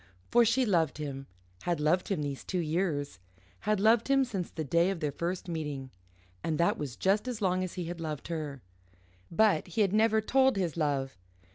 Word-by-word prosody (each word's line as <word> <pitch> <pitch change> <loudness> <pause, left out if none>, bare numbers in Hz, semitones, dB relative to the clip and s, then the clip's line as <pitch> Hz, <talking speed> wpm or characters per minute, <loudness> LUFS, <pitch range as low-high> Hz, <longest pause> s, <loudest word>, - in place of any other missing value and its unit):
For 240 0 +6
she 245 +3 +3
loved 165 -9 +1
him, 140 -3 -5 0.3
had 175 -3 -1
loved 155 +5 +2
him 180 -7 -1
these 140 -2 -4
two 185 - -3
years, 155 - -1 0.4
had 215 -1 0
loved 220 +2 +4
him 275 0 +4
since 195 -8 -4
the 160 - -4
day 170 +5 +2
of 195 -3 -2
their 150 -3 -1
first 175 +5 -3
meeting. 150 -6 -4 0.5
And 160 -2 -1
that 170 - +2
was 135 -5 -4
just 205 +5 +1
as 245 -4 -3
long 185 -2 +1
as 185 - -5
he 180 -2 -3
had 170 0 -6
loved 155 -3 -4
her. 150 -6 -4 0.7
But 195 -2 +3
he 180 +5 -1
had 195 -2 +2
never 220 0 +4
told 265 +4 +3
his 180 -5 -1
love. 140 -4 -1
170 Hz, 200 wpm, -30 LUFS, 150-205 Hz, 0.7 s, For